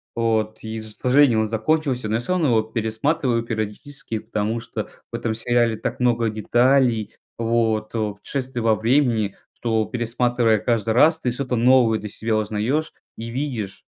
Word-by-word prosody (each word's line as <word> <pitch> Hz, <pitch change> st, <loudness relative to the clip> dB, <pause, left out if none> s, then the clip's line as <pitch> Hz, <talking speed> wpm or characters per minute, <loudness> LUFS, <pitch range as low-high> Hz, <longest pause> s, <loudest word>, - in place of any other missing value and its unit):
вот, 110 Hz, -2 st, 0 dB
и 110 Hz, 0 st, -5 dB
ж 110 Hz, -1 st, -9 dB
к -, -, -29 dB
сожалению 125 Hz, -3 st, +4 dB
он 110 Hz, -, 0 dB
закончился, 125 Hz, +1 st, 0 dB
но 110 Hz, -, 0 dB
я 115 Hz, -, 0 dB
всё 180 Hz, -, -1 dB
равно 165 Hz, -7 st, +2 dB
его 110 Hz, -2 st, +4 dB
пересматриваю 115 Hz, +3 st, -1 dB
периодически. 115 Hz, +3 st, -5 dB
Потому 110 Hz, +1 st, -2 dB
что -, -, -6 dB, 0.2 s
в -, -, -5 dB
этом 115 Hz, -1 st, -2 dB
сериале 120 Hz, 0 st, +1 dB
так -, -, -4 dB
много 120 Hz, -2 st, +2 dB
деталей, 120 Hz, 0 st, +2 dB, 0.2 s
вот 115 Hz, -2 st, 0 dB
путешествий 115 Hz, +4 st, -3 dB
во 110 Hz, -1 st, +3 dB
времени, 115 Hz, -3 st, +1 dB, 0.2 s
что 110 Hz, -2 st, 0 dB
пересматривая 120 Hz, -2 st, +1 dB
каждый 110 Hz, -1 st, 0 dB
раз, 160 Hz, +6 st, +5 dB
ты 125 Hz, -, -1 dB
что-то 125 Hz, 0 st, -2 dB
новое 120 Hz, -2 st, +4 dB
для 105 Hz, -1 st, -7 dB
себя 110 Hz, +2 st, -2 dB
узнаешь 110 Hz, +9 st, -1 dB, 0.2 s
и 115 Hz, -, -6 dB
видишь. 120 Hz, -7 st, -4 dB
115 Hz, 165 wpm, -22 LUFS, 110-125 Hz, 0.2 s, раз